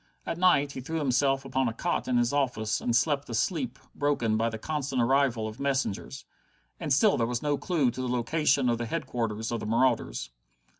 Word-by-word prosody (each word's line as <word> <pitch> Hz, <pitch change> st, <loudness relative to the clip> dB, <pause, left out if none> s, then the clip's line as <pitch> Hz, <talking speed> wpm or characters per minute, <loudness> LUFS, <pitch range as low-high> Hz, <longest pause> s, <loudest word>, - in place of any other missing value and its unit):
At 165 Hz, -, -3 dB
night 145 Hz, -6 st, +4 dB
he 130 Hz, -, -6 dB
threw 160 Hz, +6 st, -4 dB
himself 135 Hz, -1 st, +1 dB
upon 130 Hz, -1 st, 0 dB
a -, -, -5 dB
cot 175 Hz, +8 st, -1 dB
in 125 Hz, -1 st, +2 dB
his 120 Hz, +2 st, +1 dB
office 120 Hz, -6 st, 0 dB
and 120 Hz, -, 0 dB
slept 145 Hz, +1 st, +1 dB
a 115 Hz, -, -3 dB
sleep 135 Hz, -, -1 dB, 0.2 s
broken 140 Hz, -7 st, 0 dB
by 115 Hz, +1 st, +1 dB
the 110 Hz, -, -5 dB
constant 140 Hz, 0 st, -3 dB
arrival 120 Hz, -2 st, +2 dB
of 110 Hz, +3 st, -8 dB
messengers. 135 Hz, -, -2 dB, 0.5 s
And -, -, -4 dB
still 170 Hz, +5 st, +4 dB
there 115 Hz, -2 st, +1 dB
was 120 Hz, +2 st, -2 dB
no 145 Hz, -1 st, +1 dB
clue 145 Hz, -5 st, +1 dB
to 130 Hz, -, -6 dB
the 130 Hz, -, -2 dB
location 130 Hz, +3 st, +1 dB
of 120 Hz, -1 st, +1 dB
the 120 Hz, -, -3 dB
headquarters 115 Hz, -7 st, -3 dB
of 120 Hz, -, -1 dB
the 105 Hz, -, -5 dB
marauders. 115 Hz, -, +1 dB
130 Hz, 205 wpm, -28 LUFS, 115-145 Hz, 0.5 s, night